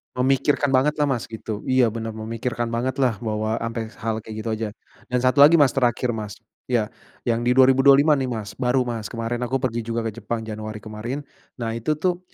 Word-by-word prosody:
Memikirkan 135 +3 +2
banget 150 +3 +2
lah 145 - +3
Mas 125 -7 -1
gitu. 110 0 -6
Iya 130 -2 +3
benar 115 0 -4
memikirkan 115 +2 -3
banget 125 +4 -2
lah 125 -5 +2
bahwa 110 0 -1
ampe 115 -1 -3
hal 110 0 -2
kayak 110 0 -9
gitu 115 - -3
aja, 110 -1 -2 0.4
dan 125 0 0
satu 130 +2 +3
lagi 150 +4 +9
Mas, 145 -5 +5
terakhir 125 -1 +1
Mas, 105 -2 -5 0.3
iya 115 -3 0 0.3
yang 120 0 0
di 125 - +3
2025 135 +3 +6
nih 130 - -1
Mas, 110 -4 -4
baru 125 0 +2
Mas, 115 -4 -4
kemarin 115 +1 -3
aku 125 +2 -2
pergi 120 -2 0
juga 115 0 -1
ke 110 -2 -4
Jepang 115 -1 -3
Januari 110 -1 -6
kemarin, 115 +7 -5 0.3
nah 115 -3 -3
itu 115 +7 -1
tuh 180 +3 0
120 Hz, 200 wpm, -23 LUFS, 110-130 Hz, 0.4 s, lagi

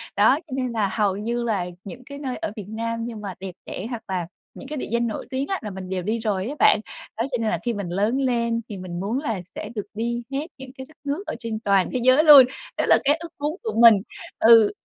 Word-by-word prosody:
Đó, 235 +8 +5
cho 275 - -8
nên 255 -2 -1
là 215 -4 0
hầu 205 -3 +1
như 235 +3 -2
là 210 -6 0 0.2
những 245 +6 -9
cái 280 +1 -9
nơi 265 -3 -4
ở - - -4
Việt 210 - -7
Nam 230 +2 -3
nhưng 230 -3 -6
mà 200 -2 -5
đẹp 190 -1 -6
đẽ, 185 - -6
hoặc 235 -3 -5
là 180 -3 -2 0.3
những - - -9
cái 300 +2 -5
địa - - -4
danh 235 0 +1
nổi 220 - -5
tiếng 265 +2 -2
á 385 - -2
là 215 - -5
mình 185 -1 -7
đều 185 -1 -2
đi 220 +5 -1
rồi 210 -3 -1
á 285 - -4
bạn. - - +6 0.4
Đó, 225 - 0
cho 250 - 0
nên 220 - +1
là - - -1
khi 240 - +1
mình 200 -4 -4
lớn 205 +8 +1
lên 235 -3 0
thì 205 - -6
mình 180 -2 -6
muốn 210 +7 -1
là 225 -10 -3
sẽ 210 - -6
được 210 - -3
đi 235 +2 -2
hết 280 +3 -2
những 265 -1 -10
cái 265 - -7
đất 310 - -19
nước 290 +7 -2
ở - - -3
trên 230 -2 -4
toàn 200 -4 +2
thế 255 - 0
giới 255 +4 +6
luôn. 290 -5 +10 0.3
Đó - - +1
là - - +7
cái 290 +2 +4
ước 335 0 -7
muốn 295 +2 -1
của 445 - -2
mình. 225 -4 +8 0.4
Ừ. 225 -2 +7
230 Hz, 270 wpm, -23 LUFS, 205-260 Hz, 0.4 s, luôn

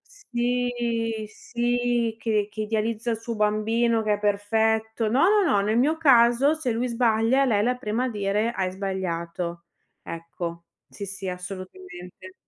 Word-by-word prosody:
Sì, 240 - -1
sì, 240 -1 -1
che 215 -3 0
che 215 - -4
idealizza 220 +2 -1
il 225 - -1
suo 230 +1 -5
bambino, 220 +2 +1
che 215 - +2
è - - -9
perfetto. 220 +2 +1
No, 255 +5 +2
no, 420 0 +4
no, 200 - +3
nel 215 +3 +1
mio 295 +6 +3
caso 265 -1 +5
se 315 -6 -2
lui 245 +2 -1
sbaglia 235 +3 +2
lei 215 -5 +2
è - - +3
la 245 +4 +1
prima 225 +1 -2
a 255 - 0
dire: 210 +2 0
"Hai 190 -5 -1
sbagliato." 175 -3 -4 0.4
Ecco, 170 0 -6 0.2
sì, 200 - -7
sì, 195 -1 -6
assolutamente. 185 - -9
220 Hz, 155 wpm, -25 LUFS, 200-240 Hz, 0.4 s, caso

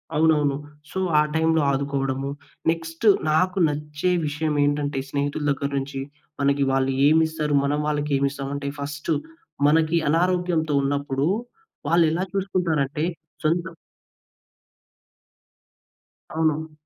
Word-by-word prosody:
అవునవును. 150 -3 +3 0.4
సో, 190 - -3 0.2
ఆ - - +6
టైంలో 160 0 +3
ఆదుకోవడము. 135 -1 -1 0.4
నెక్స్ట్ 165 +3 -5 0.3
నాకు 185 +4 +2
నచ్చే 150 +3 -2 0.2
విషయమేంటంటే, 145 -2 0
స్నేహితుల 145 +1 -2
దగ్గర 140 0 -2
నుంచి, 135 0 -3 0.4
మనకి 140 0 +2
వాళ్ళు 135 0 +1 0.2
ఏమిస్తరు, 160 -1 +2
మనం 145 +1 0
వాళ్ళకేమిస్తాం 140 -2 -1
అంటే 140 0 -3
ఫస్టు 145 +2 -2 0.5
మనకి 160 +2 +3
అనారోగ్యంతో 175 -2 +1
ఉన్నప్పుడు, 140 0 0 0.6
వాళ్ళెలా 170 +1 +3
చూసుకుంటారంటే 165 -7 0 0.4
సొంత 165 +2 +1 2.7
అవును. 160 0 0
150 Hz, 95 wpm, -24 LUFS, 140-160 Hz, 2.7 s, ఆ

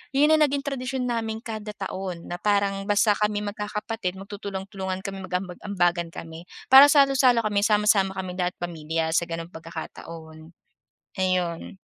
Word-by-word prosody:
yun 295 +3 +5
ang 310 - +5
naging 280 0 -2
tradisyon 260 -1 -3
namin 225 -1 -3
kada 215 -2 -6
taon 185 -3 -5
na 175 - -4
parang 200 -1 0
basta 205 +1 +4
kami 210 0 0
magkakapatid 210 -1 -4
magtutulong-tulungan 195 -1 -6
kami 195 -2 -5
mag-aambag-ambagan 180 -1 -1
kami 165 +1 -9 0.3
para 275 +2 +11
salo-salo 270 -5 +4
kami, 205 -1 +1
sama-sama 210 -2 +3
kaming 185 -1 -5
lahat 180 0 -1
pamilya 160 -1 -2
sa 170 - +2
gano'ng 165 +1 -6
pagkakataon. 160 0 -9 0.7
Ayun. 185 0 -1
195 Hz, 135 wpm, -25 LUFS, 175-215 Hz, 0.7 s, para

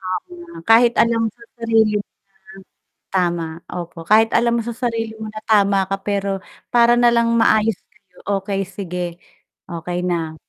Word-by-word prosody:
Tama, 185 -1 -3 0.5
kahit 230 +1 +6
alam 230 0 +1
mo - - 0
sa 235 - -15
sarili 225 -2 +2
mo 205 - -6 0.9
na - - -58
tama, 175 -3 +1 0.3
opo. 175 -1 -7
Kahit 220 +5 +4
alam 235 0 +3
mo - - -1
sa 235 -1 -5
sarili 230 -2 -2
mo 220 0 -7
na 215 0 -8
tama 200 -2 +4
ka 195 - +1
pero 200 -1 -1 0.3
para 240 0 +5
na 240 0 +6
lang 235 0 +2
maayos 220 -2 +3
kayo, 185 -2 -33 0.2
okey 195 0 -3
sige, 180 -2 -5 0.7
okey 175 +1 -4
na. 165 -3 -2
210 Hz, 165 wpm, -20 LUFS, 180-230 Hz, 0.9 s, kahit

